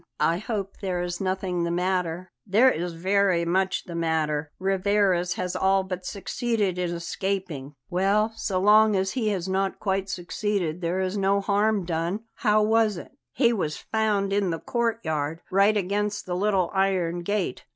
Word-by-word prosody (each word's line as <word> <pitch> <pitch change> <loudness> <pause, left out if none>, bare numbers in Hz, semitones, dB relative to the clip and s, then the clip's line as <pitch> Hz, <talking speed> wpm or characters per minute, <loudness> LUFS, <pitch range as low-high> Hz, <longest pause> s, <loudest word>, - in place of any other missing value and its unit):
"I 170 +2 +2
hope 200 -2 -4
there 180 -3 -1
is 175 +1 -4
nothing 185 -2 -1
the 170 - -1
matter?" 180 0 -1 0.2
"There 225 +7 +5
is 175 -3 -3
very 185 0 +2
much 185 +2 0
the 175 - -9
matter. 155 -3 -1
Rivarez 190 -2 +1
has 180 -1 -3
all 195 0 +2
but 185 -1 -5
succeeded 210 -3 -1
in 180 -1 0
escaping." 170 -4 -4
"Well, 200 +5 +1
so 190 -4 -1
long 210 +2 +5
as 190 0 0
he 230 -1 -1
has 190 -3 -2
not 190 0 0
quite 195 -1 -1
succeeded 180 -2 -2
there 175 +2 -1
is 190 +2 -1
no 195 0 +2
harm 205 0 +1
done. 170 +4 -2 0.2
How 215 -2 +3
was 220 -2 +2
it?" - - -9 0.2
"He 240 -3 +3
was 155 -8 -2
found 210 -3 +1
in 200 -2 +1
the 165 - -1
courtyard, 165 -10 -2
right 200 +3 +4
against 205 +2 -1
the 180 - -3
little 190 -2 +1
iron 185 -3 +1
gate. 195 -6 -2
190 Hz, 165 wpm, -25 LUFS, 175-205 Hz, 0.2 s, There